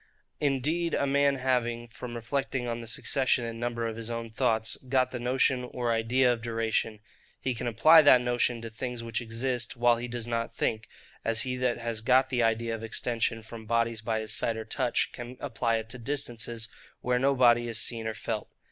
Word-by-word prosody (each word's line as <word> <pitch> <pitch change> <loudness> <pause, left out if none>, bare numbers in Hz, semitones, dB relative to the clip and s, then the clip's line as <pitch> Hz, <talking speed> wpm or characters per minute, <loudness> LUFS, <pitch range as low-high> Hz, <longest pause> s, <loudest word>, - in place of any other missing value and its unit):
Indeed 150 +5 +1
a - - +1
man 140 0 +3
having, 120 -3 0
from 120 +1 -8
reflecting 125 +2 -2
on 120 0 -3
the 115 - -9
succession 130 +2 +1
and 115 0 -5
number 120 -1 -2
of 115 -1 -3
his 115 0 -6
own 115 -1 -4
thoughts, 110 -2 0
got 130 -1 +2
the 125 - -4
notion 125 +1 +2
or 125 -1 -2
idea 120 +3 +3
of 115 - -6
duration, 115 -1 -1 0.4
he 130 - -1
can 120 - -4
apply 155 +8 +7
that 145 -4 +7
notion 120 -1 0
to 115 - -6
things 120 +1 -4
which 115 0 -2
exist 120 +1 -2
while 120 0 +4
he 120 +1 -4
does 120 -1 -4
not 115 -1 -2
think; 110 0 -2 0.4
as 115 0 +1
he 125 -1 -2
that 125 -1 +1
has 115 -2 -4
got 130 +4 +3
the 125 -2 +1
idea 115 0 +1
of 115 - -5
extension 115 0 -1
from 110 0 -10
bodies 115 -1 +1
by 110 0 -1
his 110 0 -1
sight 115 0 +1
or 110 - -5
touch, - - 0
can 120 +1 -8
apply 115 -3 -1
it 110 0 -5
to 125 - -7
distances, 120 -4 -4 0.3
where 125 0 +1
no 140 +2 +3
body 120 -2 +5
is 115 -1 -2
seen 115 -1 -1
or 110 - -3
felt. 110 -2 -4
120 Hz, 205 wpm, -28 LUFS, 115-125 Hz, 0.4 s, apply